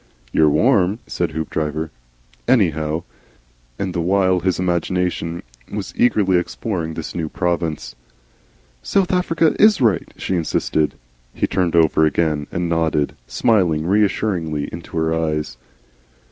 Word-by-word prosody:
"You're 80 -1 +4
warm," 100 - +3
said 85 - -2
Hoopdriver, 80 0 -3 0.6
"anyhow," 80 - +2 0.7
and 95 -2 -3
the 85 - -1
while 95 +1 +2
his 95 0 0
imagination 90 -1 -1 0.3
was - - -5
eagerly 100 -6 +3
exploring 85 -3 -4
this 80 - -5
new 80 -3 -3
province. 85 -7 -2 0.9
"South 190 - +1
Africa 165 -3 +2
IS 215 0 +6
right?" 110 -8 +1
she 95 - -2
insisted. 80 -2 0 0.4
He - - +1
turned 90 -3 0
over 80 -1 +4
again 75 -2 +1
and 85 0 -1
nodded, 80 -3 0
smiling 90 -10 +2
reassuringly 90 -6 0
into 85 0 -7
her 80 0 +1
eyes. 75 -5 -2
85 Hz, 120 wpm, -20 LUFS, 80-95 Hz, 0.9 s, IS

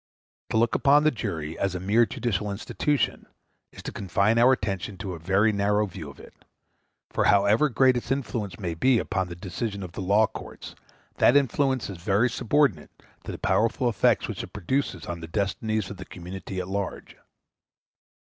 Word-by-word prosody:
To - - 0
look 115 +1 +2
upon 145 +3 +4
the 155 - +4
jury 80 - -4
as 100 -2 -1
a - - -2
mere 110 +5 +3
judicial 105 -4 -2
institution 130 +8 -1 0.4
is - - -12
to - - -5
confine 100 +3 +1
our 125 +2 +6
attention 100 -5 -2
to 95 0 -5
a 85 - -7
very 95 +6 +2
narrow 105 +1 +1
view 90 -7 -8
of 70 - -14
it; - - -14 0.8
for - - +1
however 105 +9 +4
great 130 0 +4
its 120 - -4
influence 120 -8 -2
may 90 -4 -3
be 125 +10 +3
upon 95 -4 -1
the 85 - -7
decisions 100 +3 -4
of 90 - -7
the 90 - -6
law 100 +4 +4
courts, - - -9 0.5
that 130 - +6
influence 135 -1 +1
is 95 -4 -8
very 105 +6 +2
subordinate 125 - +1 0.4
to - - -5
the - - -6
powerful 115 +3 +1
effects 110 -5 +2
which - - -4
it - - -10
produces 130 +9 -2
on 85 0 -5
the 80 - -8
destinies 105 +3 -2
of 100 - -8
the 95 - -8
community 95 +1 -7
at 90 - -4
large. 100 0 -4
100 Hz, 185 wpm, -26 LUFS, 95-120 Hz, 0.8 s, our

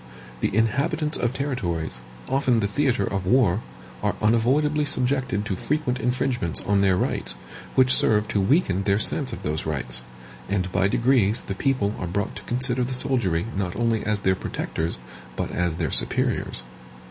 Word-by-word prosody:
The - - +1
inhabitants 140 +7 +1
of 120 - 0
territories, 95 - -3 0.3
often 130 -3 +2
the 105 - +1
theatre 120 -1 +1
of 95 -2 -3
war, 110 -3 +3 0.4
are - - 0
unavoidably 135 +8 +2
subjected 130 -7 0
to 100 - -2
frequent 130 +2 -1
infringements 125 - -1
on 100 -1 +2
their 95 -2 +3
rights, - - -1 0.4
which 130 -1 +5
serve 105 -1 +4
to 100 - +1
weaken 100 - +2
their 100 0 +2
sense 130 +4 +1
of - - -7
those 75 +1 -2
rights; 65 -5 -3 0.5
and 95 -2 -1
by 90 +2 +2
degrees 115 -1 +2
the - - -4
people 105 -2 0
are 90 - -3
brought 100 +5 -2
to - - -7
consider 125 0 0
the 130 +1 -1
soldiery 120 -11 +1
not 95 -2 -2
only 115 -2 0
as 105 -1 -1
their 95 - +3
protectors, 85 -2 -3 0.4
but - - -3
as 85 -2 -1
their - - -2
superiors. 65 - +1
110 Hz, 165 wpm, -24 LUFS, 95-130 Hz, 0.5 s, which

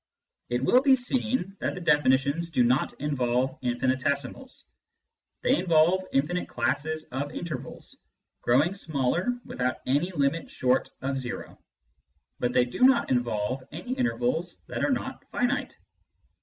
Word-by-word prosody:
It 120 +2 0
will 250 - +5
be 270 -1 +6
seen 245 -6 -2
that - - -2
the - - -5
definitions 145 0 +2
do 135 -7 +2
not 125 +4 +1
involve 130 -2 0
infinitesimals. 130 - -2 0.8
They 265 +3 +3
involve 175 +2 +3
infinite 160 +7 0
classes 145 +6 -1
of 140 +3 -3
intervals, 170 -3 -7 0.4
growing 145 +9 +3
smaller 160 - -1 0.2
without 125 0 -2
any 145 +8 +1
limit 145 0 0
short 130 0 +1
of 135 0 -1
zero, 125 -2 -7 0.8
but 125 - 0
they 125 0 +3
do 120 - -8
not 255 - +5
involve 120 0 0
any 175 +11 -5
intervals 240 - -1
that - - -3
are - - +2
not - - -2
finite. - - -1
145 Hz, 130 wpm, -27 LUFS, 130-175 Hz, 0.8 s, be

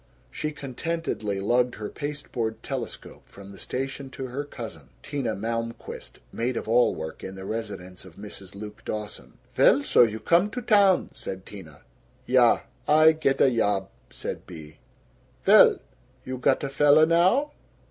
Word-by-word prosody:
She 155 - -3
contentedly 140 -7 -3
lugged 120 +5 +1
her 105 -1 -5
pasteboard 130 -6 -5
telescope 130 -5 -6
from 100 0 -12
the 95 - -13
station 135 +1 -5
to 130 0 -6
her 135 +4 -3
cousin, 110 - -9
Tina 135 -6 -2
Malmquist, 115 +3 -5 0.2
maid 120 +1 -2
of - - -5
all 120 +2 +3
work 80 0 -7
in 95 - -7
the 95 0 -8
residence 100 -5 -6
of 95 -3 -14
Mrs. 100 -2 -9
Luke 105 +1 -9
Dawson. 105 -1 -6 0.2
"Vell, - - +5
so - - +4
you 110 -2 +3
come 175 - +3
to 250 - -5
town," 200 -4 +4
said 95 0 -7
Tina. 80 -8 -12 0.4
"Ya. 125 -2 +4 0.3
Ay 155 +1 +7
get 145 -4 0
a 135 - +5
yob," 100 -4 0 0.2
said - - -7
Bea. 80 -3 -11 0.7
"Vell.... - - +7 0.5
You 130 -1 -5
got 130 +2 +2
a 140 - -2
fella 145 +2 +5
now?" 185 - +3
120 Hz, 155 wpm, -26 LUFS, 100-145 Hz, 0.7 s, Ay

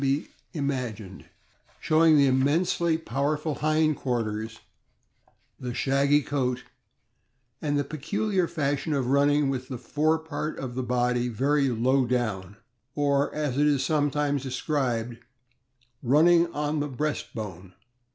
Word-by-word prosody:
be 140 +2 0 0.2
imagined, 125 - -4 0.5
showing 155 0 +4
the 140 - +5
immensely 160 +5 +2
powerful 150 +1 -2
hind 155 0 +2
quarters, 110 -4 -3 1.0
the 125 -1 -5
shaggy 140 +2 +2
coat, 125 -4 -1 1.0
and 145 -2 0
the 145 - +1
peculiar 180 +6 -1
fashion 145 -1 -1
of 135 -3 0
running 140 +2 +3
with 130 -1 -3
the 130 - -5
fore 150 +6 +1
part 160 -1 -5
of 130 -2 -5
the 130 - -2
body 125 0 0
very 135 +4 +1
low 125 +2 +2
down, 105 -6 -2 0.4
or, 140 -1 +1
as 145 -3 -1
it 150 - +4
is 140 -3 +2
sometimes 145 -1 0
described, 125 -3 -2 0.8
"running 170 +6 +4
on 150 0 -2
the 145 - -1
breast 145 +1 -3
bone." 95 -4 -7
140 Hz, 125 wpm, -26 LUFS, 125-150 Hz, 1.0 s, the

